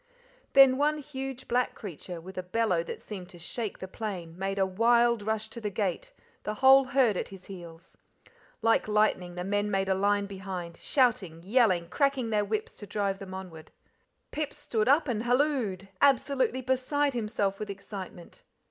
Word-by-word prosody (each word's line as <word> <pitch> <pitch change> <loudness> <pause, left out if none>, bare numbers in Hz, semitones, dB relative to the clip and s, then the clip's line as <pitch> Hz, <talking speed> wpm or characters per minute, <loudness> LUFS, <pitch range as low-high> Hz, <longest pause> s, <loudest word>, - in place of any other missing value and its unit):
Then 270 -1 +7
one 300 +1 +2
huge 270 -3 -6
black 250 +1 +1
creature, 180 -3 -7
with 185 +3 -11
a 185 - -2
bellow 185 -1 +1
that 170 - -6
seemed 185 -4 -8
to 180 - -13
shake 205 +5 -4
the 190 - -7
plain, 185 -6 -6
made 195 +2 -3
a 195 - +3
wild 235 +4 +3
rush 220 +1 -2
to 235 +1 -8
the 210 - -2
gate, 195 -3 -2 0.3
the 210 - -4
whole 265 +3 +7
herd 255 -5 +3
at - - -3
his 190 -2 -12
heels. 170 -2 -11 0.6
Like 225 -1 +3
lightning, 210 -4 +1
the 180 - -4
men 205 +2 0
made 195 -1 0
a - - +4
line 200 +1 +2
behind, 190 -3 -6
shouting, 215 - +1
yelling, 190 -5 +3
cracking 260 - 0
their 210 -1 +2
whips 215 +1 -3
to 205 - -9
drive 200 -2 -1
them 190 -1 -8
onward. 175 -4 -9 0.6
Pip 300 -1 -3
stood 235 -7 -1
up 300 +3 +4
and 225 -4 -1
halloed, 240 -7 0
absolutely 270 -1 +3
beside 260 +3 +1
himself 210 -4 -1
with 210 - -5
excitement. 195 -3 -8
210 Hz, 175 wpm, -29 LUFS, 190-250 Hz, 0.6 s, Then